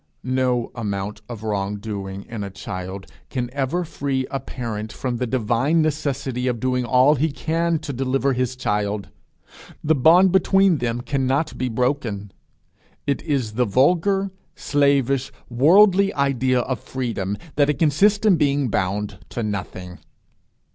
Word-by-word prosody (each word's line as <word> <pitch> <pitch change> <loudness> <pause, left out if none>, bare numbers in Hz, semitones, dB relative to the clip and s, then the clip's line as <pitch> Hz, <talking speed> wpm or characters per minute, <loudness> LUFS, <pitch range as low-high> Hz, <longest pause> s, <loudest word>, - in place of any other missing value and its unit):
No 125 -2 0
amount 105 -3 -4
of 115 -3 -7
wrong 100 -2 -2
doing 100 -2 -6
in 115 -3 -5
a 100 - -5
child 95 +1 -6 0.2
can 125 -2 -3
ever 140 +6 -1
free 140 -4 -2
a 135 - -1
parent 110 -5 -5
from 125 0 -3
the 125 +1 -2
divine 130 +7 +1
necessity 135 -4 -2
of 120 -2 -1
doing 125 +1 0
all 130 +4 +5
he 155 +2 0
can 165 +3 0
to 150 -2 -6
deliver 135 +1 0
his 130 0 -1
child; 105 -4 -2 0.7
the 155 0 +3
bond 170 +7 +5
between 190 -2 +4
them 120 0 -2
cannot 135 +3 -1
be 130 - -2
broken. 115 -5 -1 0.7
It 140 - 0
is 135 -9 -1
the 125 +3 +1
vulgar, 180 - +2 0.2
slavish, 140 -2 +1 0.2
worldly 190 - +5
idea 130 -2 +1
of 125 -2 -3
freedom, 110 -7 -3 0.2
that 145 0 +3
it 150 - +1
consists 200 +8 +3
in 195 -5 +5
being 140 -3 +1
bound 100 0 -2
to 120 - -4
nothing. 95 -3 -5
130 Hz, 145 wpm, -22 LUFS, 110-145 Hz, 0.7 s, all